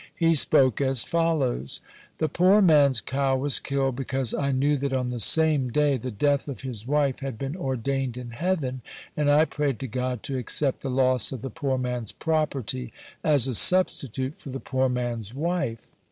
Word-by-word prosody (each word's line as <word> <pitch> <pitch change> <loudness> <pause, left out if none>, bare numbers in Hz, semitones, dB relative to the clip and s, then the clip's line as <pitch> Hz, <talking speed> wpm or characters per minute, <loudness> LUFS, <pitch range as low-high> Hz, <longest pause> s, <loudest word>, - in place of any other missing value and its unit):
He 165 -1 +2
spoke 135 -4 +3
as 135 -3 +2
follows: 155 - -1 0.4
"The 155 - 0
poor 185 +7 +4
man's 145 - +4
cow 135 +3 0
was 140 0 +1
killed, 135 -2 -2
because 135 -2 -2
I 140 -1 -1
knew 140 +3 +1
that 140 0 -3
on 125 -1 -1
the 125 -1 -4
same 150 - +3
day 145 +2 +2
the 130 0 -5
death 140 +6 0
of 140 - -6
his 120 -4 -6
wife 140 -2 +1
had 135 -4 -5
been 135 +5 -4
ordained 135 -4 -3
in 125 -1 -7
heaven, 135 -2 -2 0.3
and 150 -1 +1
I 150 +2 +5
prayed 145 -6 -2
to 135 - -4
God 125 0 -3
to 135 -2 -3
accept 135 +3 +1
the 135 - -4
loss 130 -2 +2
of 130 -4 -7
the 135 - -5
poor 140 -5 -2
man's 125 -3 -3
property 135 -6 -2 0.3
as 145 -5 +2
a 130 - -2
substitute 135 - +2
for - - -10
the 135 +1 -5
poor 130 -1 -1
man's 120 -3 -4
wife. 160 -7 -3
135 Hz, 185 wpm, -25 LUFS, 125-145 Hz, 0.4 s, I